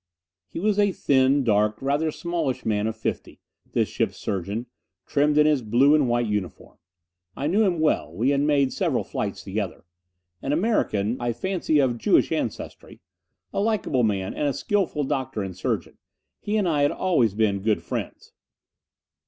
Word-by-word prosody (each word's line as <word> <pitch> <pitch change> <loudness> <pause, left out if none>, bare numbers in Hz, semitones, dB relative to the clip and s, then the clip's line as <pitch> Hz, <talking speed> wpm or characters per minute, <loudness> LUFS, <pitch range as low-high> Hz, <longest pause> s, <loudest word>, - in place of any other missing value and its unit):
He - - -6
was 205 +2 +1
a 205 -1 +4
thin, 135 -3 +2
dark, 105 -2 +2
rather 145 +4 0
smallish 170 -5 -3
man 105 -1 0
of 110 - -3
fifty, - - -4 0.3
this - - +2
ship's - - -2
surgeon, 100 +5 -3 0.4
trim 145 +1 +2
in 150 - +6
his 150 -3 +3
blue 120 +6 +4
and 145 -5 +3
white 120 0 +1
uniform. 105 -6 -4 0.6
I 140 - -3
knew 190 +8 +2
him 180 -5 +1
well: 155 - +1
we 115 +11 +1
had 140 0 +2
made 145 -2 +2
several - - 0
flights - - -4
together. - - -4 0.6
An 135 - -1
American 130 - +1
I 120 -1 0
fancy 170 +4 0
of 130 -4 +2
Jewish - - +3
ancestry. - - -4 0.5
A - - -1
likable 205 - +1
man, 100 -4 0
and 145 - -1
a 140 - 0
skillful 165 0 -1
doctor 130 -6 -2
and 95 -2 -6
surgeon. 95 - -3 0.4
He 210 +1 -1
and 200 -4 +1
I 150 -4 +1
had 145 - +3
always 125 - +1
been 105 -2 +1
good 110 +1 0
friends. - - -6
135 Hz, 170 wpm, -24 LUFS, 110-155 Hz, 0.6 s, in